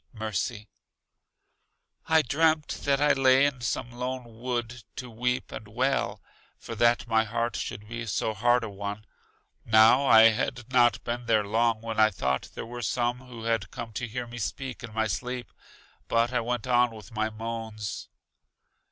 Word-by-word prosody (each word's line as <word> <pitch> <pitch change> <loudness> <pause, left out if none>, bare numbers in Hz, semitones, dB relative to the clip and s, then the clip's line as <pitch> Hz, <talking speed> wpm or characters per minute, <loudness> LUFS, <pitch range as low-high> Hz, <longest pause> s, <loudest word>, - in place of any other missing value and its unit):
Mercy: 110 0 -3 1.4
I 160 -1 +4
dreamt 155 +3 +2 0.2
that 140 -1 +2
I 150 0 +4
lay 135 0 +5
in 135 -3 -1
some 120 0 -2
lone 125 -2 -6
wood 120 -1 -3
to 125 -1 -7
weep 125 +3 -2
and 110 - -8
wail, 130 +6 -1 0.3
for 115 - -8
that 120 +1 +3
my 110 -1 +3
heart 115 +2 -2
should 105 - -5
be 115 +1 -5
so 110 +2 -1
hard 120 +3 +2
a 110 - -4
one. 100 +1 -6 0.6
Now 115 +5 +5
I 110 -1 +8
had 120 +3 -3
not 120 -1 +4
been 120 0 -4
there 110 -2 +3
long 115 +1 +1
when 115 -1 -4
I 110 0 +6
thought 65 -9 -2
there - - -5
were 120 +1 -7
some 120 +2 0
who 125 -3 -11
had 115 -4 0
come 115 -2 -7
to 120 +3 -3
hear 120 +2 -4
me 120 0 -9
speak 130 +2 -5
in 115 - -7
my 110 0 +1
sleep; 120 +5 -4 0.6
but 115 +2 +1
I 125 - +2
went 120 0 -2
on 125 -1 +4
with 110 +2 -12
my 110 -1 -1
moans. 110 -1 -6
120 Hz, 170 wpm, -27 LUFS, 110-125 Hz, 1.4 s, I